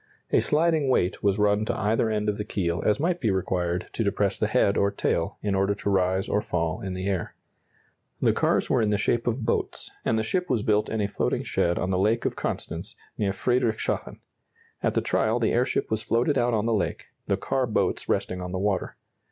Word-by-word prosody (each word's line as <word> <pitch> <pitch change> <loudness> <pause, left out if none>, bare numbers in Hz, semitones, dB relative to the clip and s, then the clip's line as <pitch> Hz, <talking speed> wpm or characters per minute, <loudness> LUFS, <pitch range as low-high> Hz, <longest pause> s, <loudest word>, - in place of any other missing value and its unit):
A - - +5
sliding 155 -2 +2
weight 95 -7 +1
was 100 0 +2
run 105 0 +3
to - - -2
either 110 +2 +1
end 105 -1 -1
of 105 0 -1
the - - -1
keel 90 -5 -1
as 105 - +2
might 175 +3 0
be 110 - +2
required 90 -2 -1
to - - -1
depress - - 0
the - - +2
head 100 - +2
or 100 - +3
tail, 85 -1 -1
in 100 -1 0
order 100 +1 +1
to 100 - -3
rise 95 0 +1
or 105 - +1
fall 85 +3 -2
in 95 -3 -4
the 95 +1 -4
air. 95 -4 -2 0.8
The - - +3
cars - - +1
were - - +2
in 110 - +2
the 105 - +2
shape 115 +3 0
of 120 0 -1
boats, 115 - -2
and 110 - +1
the 110 - +1
ship 180 +10 -1
was 115 -5 +1
built 105 0 +2
in 110 - -1
a 100 - +1
floating 100 - -1
shed 85 0 0
on 90 - -1
the 90 - +1
Lake 110 +4 +2
of - - 0
Constance - - -4 0.2
near 100 -2 0
Friedrichshafen. 120 +2 -1 0.6
At - - 0
the - - +3
trial 110 +2 +1
the 115 - +1
airship 120 -1 0
was 110 -1 0
floated 115 +5 +1
out 120 -2 +2
on 105 0 0
the 115 - +1
lake, 105 - -2 0.2
the - - +1
car 130 -2 -1
boats 110 - -1
resting 90 0 -1
on 90 0 -5
the 95 - -2
water. 100 0 -1
105 Hz, 225 wpm, -26 LUFS, 95-115 Hz, 0.8 s, A